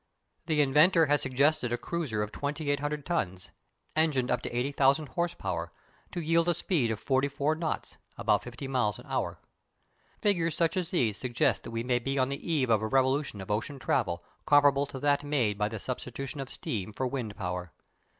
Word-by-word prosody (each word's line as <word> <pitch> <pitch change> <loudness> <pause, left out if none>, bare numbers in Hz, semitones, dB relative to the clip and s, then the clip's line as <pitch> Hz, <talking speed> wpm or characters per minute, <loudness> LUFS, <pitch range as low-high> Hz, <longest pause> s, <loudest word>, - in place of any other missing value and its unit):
The 155 -3 +3
inventor 155 +5 +5
has 145 -1 +2
suggested 130 -1 +2
a 120 - +1
cruiser 135 -9 -2
of 105 - -5
2800 145 0 -2
tons, 95 - -2 0.4
engined 150 -5 +2
up 125 0 +1
to - - -4
80,000 140 +3 +2
horse 175 0 -1
power, - - -3 0.4
to 175 - -3
yield 165 +2 +2
a 175 - +3
speed 155 - +1
of 110 -2 -2
forty 135 +1 +1
four 145 +2 0
knots 160 0 -3 0.2
(about 105 -1 +2
fifty 125 +3 -7
miles) 125 -6 0
an - - -12
hour. - - -2 0.8
Figures 170 -6 +1
such 165 +2 +2
as 180 -3 -1
these 115 - +1
suggest 125 +2 +1
that - - -6
we 115 0 -3
may 125 0 +1
be 135 +3 -2
on 130 0 +2
the 140 +5 -4
eve 135 -7 +2
of 110 -2 +4
a 110 - -1
revolution 130 -3 +1
of 95 - -6
ocean 115 +7 -2
travel 120 - 0 0.2
comparable 145 -1 +5
to 135 - -7
that 145 +1 +2
made 135 -8 +1
by 105 0 +1
the 110 - -5
substitution 130 +4 -5
of 135 -1 -5
steam 105 -2 -3
for 130 - -2
wind 125 -5 -3
power. 90 -2 -4
135 Hz, 190 wpm, -29 LUFS, 120-150 Hz, 0.8 s, inventor